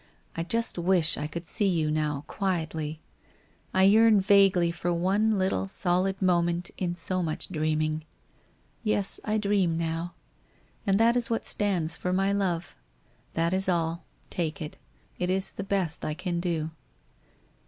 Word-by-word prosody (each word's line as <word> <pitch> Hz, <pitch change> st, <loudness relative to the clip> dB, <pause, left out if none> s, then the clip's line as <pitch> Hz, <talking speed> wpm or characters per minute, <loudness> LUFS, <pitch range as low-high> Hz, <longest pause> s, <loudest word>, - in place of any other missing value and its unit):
I 165 Hz, -, -2 dB
just 230 Hz, +3 st, -1 dB
wish 175 Hz, -2 st, +5 dB
I 150 Hz, -, -3 dB
could 170 Hz, +2 st, -6 dB
see 205 Hz, +4 st, +1 dB
you 160 Hz, -5 st, +1 dB
now, 150 Hz, -2 st, -1 dB
quietly; 160 Hz, -4 st, -3 dB, 0.7 s
I 190 Hz, -, +3 dB
yearn 215 Hz, +2 st, +6 dB
vaguely 195 Hz, -3 st, +4 dB
for 175 Hz, +1 st, -2 dB
one 200 Hz, +5 st, +1 dB
little 185 Hz, -, 0 dB
solid 185 Hz, -, +1 dB
moment 175 Hz, -1 st, +1 dB
in 175 Hz, -2 st, -2 dB
so 185 Hz, +2 st, -1 dB
much 160 Hz, -3 st, -3 dB
dreaming. 155 Hz, -1 st, -1 dB, 0.8 s
Yes, 205 Hz, -3 st, 0 dB
I 215 Hz, 0 st, 0 dB
dream 200 Hz, -5 st, +1 dB
now. 165 Hz, +1 st, -3 dB, 0.7 s
And 195 Hz, +1 st, +3 dB
that 230 Hz, +1 st, +4 dB
is 245 Hz, -1 st, +1 dB
what 230 Hz, -, -1 dB
stands 185 Hz, -6 st, +1 dB
for 180 Hz, -, -2 dB
My 195 Hz, +2 st, +1 dB
Love. 175 Hz, -5 st, -1 dB, 0.6 s
That 165 Hz, +2 st, 0 dB
is 190 Hz, 0 st, +1 dB
all. 170 Hz, -1 st, 0 dB, 0.3 s
Take 165 Hz, -4 st, -2 dB
it. 150 Hz, -2 st, -6 dB, 0.4 s
It 180 Hz, -, -1 dB
is 190 Hz, +1 st, +1 dB
the 200 Hz, -, -6 dB
best 190 Hz, -5 st, -1 dB
I 155 Hz, -, -2 dB
can 180 Hz, 0 st, -3 dB
do. 165 Hz, -3 st, -2 dB
175 Hz, 155 wpm, -27 LUFS, 165-195 Hz, 0.8 s, yearn